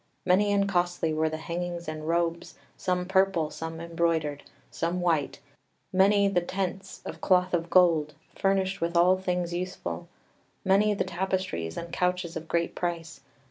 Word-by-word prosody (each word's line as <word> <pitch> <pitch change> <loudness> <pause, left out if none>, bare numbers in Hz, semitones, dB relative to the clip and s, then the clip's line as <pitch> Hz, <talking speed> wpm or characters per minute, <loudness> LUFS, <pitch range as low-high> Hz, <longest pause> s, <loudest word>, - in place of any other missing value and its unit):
Many 195 +3 +4
and 200 0 +2
costly 175 -4 0
were 160 +1 +1
the 155 - -4
hangings 170 +1 -4
and 155 0 -5
robes, 170 0 -1 0.2
some 180 -1 -1
purple, 190 -4 +2
some 160 0 -6
embroidered, 165 -3 -1 0.3
some 170 +2 -1
white; 165 -5 0 0.5
many 200 +2 +5
the 185 -3 +2
tents, 190 +2 -4
of - - -7
cloth 180 -1 +3
of 170 -1 0
gold, 165 -4 +4 0.2
furnished 195 0 0
with 170 +1 0
all 180 +2 +6
things 180 -2 -1
useful; 180 -1 -4 0.6
many 205 +2 +4
the - - 0
tapestries 185 - -2
and 170 0 -6
couches 180 -1 0
of 160 0 -6
great 170 0 0
price. 170 -2 -4
175 Hz, 150 wpm, -28 LUFS, 165-190 Hz, 0.6 s, all